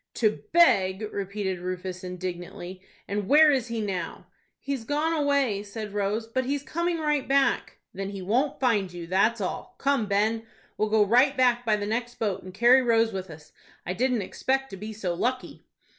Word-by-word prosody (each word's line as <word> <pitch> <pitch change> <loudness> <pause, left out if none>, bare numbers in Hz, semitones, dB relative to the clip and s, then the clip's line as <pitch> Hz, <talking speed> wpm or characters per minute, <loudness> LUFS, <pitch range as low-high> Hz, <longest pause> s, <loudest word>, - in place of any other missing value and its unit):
"To 215 -3 +1
beg!" 195 - +4
repeated 195 -2 -3
Rufus, 185 +1 -5
indignantly. 180 0 -6 0.3
"And 200 -1 -2
where 300 +3 +7
is 260 -4 0
he 230 -1 -3
now?" 185 -5 -4 0.3
"He's 275 -4 -4
gone 300 +6 0
away," 280 -9 +1
said 210 0 -7
Rose, 205 +2 -1
"but 245 +3 -1
he's 280 +1 -2
coming 340 +3 -1
right 300 -3 0
back." 270 -1 +1 0.2
"Then 195 +1 -4
he 200 -1 -6
won't 245 +10 0
find 215 -8 +1
you, 175 -1 -7
that's 200 +6 +2
all. 185 - -4
Come, 275 -6 +1
Ben, 220 +3 0 0.3
we'll 215 - 0
go 215 -1 +4
right 255 +6 +4
back 245 -2 +2
by 215 - +4
the 205 -1 -3
next 240 +3 -2
boat, 205 -4 -2
and 185 - -10
carry 240 +7 +5
Rose 225 -2 +2
with 190 -1 -5
us. 150 -1 -13 0.3
I 180 - -2
didn't 245 +1 0
expect 270 +7 -1
to - - -6
be 215 +3 -6
so 200 -5 -3
lucky." 255 +8 -2
220 Hz, 185 wpm, -26 LUFS, 190-260 Hz, 0.3 s, where